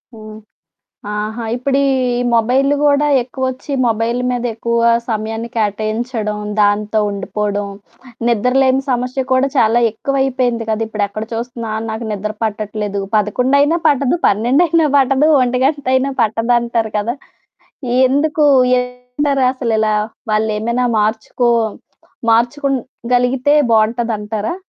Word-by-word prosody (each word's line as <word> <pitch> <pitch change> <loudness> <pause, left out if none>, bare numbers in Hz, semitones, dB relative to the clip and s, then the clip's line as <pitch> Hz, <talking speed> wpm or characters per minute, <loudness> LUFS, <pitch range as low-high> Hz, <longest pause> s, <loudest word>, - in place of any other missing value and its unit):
హ్మ్. 215 -1 -10 0.8
ఆహా! 215 +2 -4
ఇప్పుడీ 270 +3 0 0.5
మొబైల్‌లు 255 +5 +2
కూడా 290 0 +3
ఎక్కువొచ్చి 260 +2 -4
మొబైల్ 230 +1 0
మీదెక్కువ 235 -1 -1 0.3
సమయాన్ని 225 0 -3
కేటాయించడం, 215 +1 -2 0.2
దాంతో 210 +1 +1
ఉండిపోవడం, 205 +1 -3 0.6
నిద్రలేని 260 +4 +2
సమస్య 250 +1 -1
కూడా 260 +1 +3
చాలా 230 -1 +3
ఎక్కువైపోయింది 255 -1 -1
కదా! 220 0 -1
ఇప్పుడు 215 -2 -1
ఎక్కడ 215 +2 -5
చూస్తున్నా 230 0 -5 0.2
నాకు 220 +1 -5
నిద్ర 210 +1 -3
పట్టట్లేదు, 210 -1 -3 0.2
పదకొండైనా 265 - +2
పట్టదు, 280 +2 +2
పన్నెండైనా 295 - +2
పట్టదు, 270 +2 +3
ఒంటిగంటైనా 260 +1 +1
పట్టదంటారు 230 0 0
కదా! 225 +4 -2 0.9
ఎందుకు 295 +3 +1 0.3
ఏంటంటారసలిలా? 250 -3 -1 0.4
వాళ్ళేమైనా 220 +3 0
మార్చుకో 220 +3 0 0.8
మార్చుకో‌గలిగితే 250 +1 0 0.2
బావుంటదంటారా? 220 +1 0
235 Hz, 90 wpm, -16 LUFS, 215-260 Hz, 0.9 s, కూడా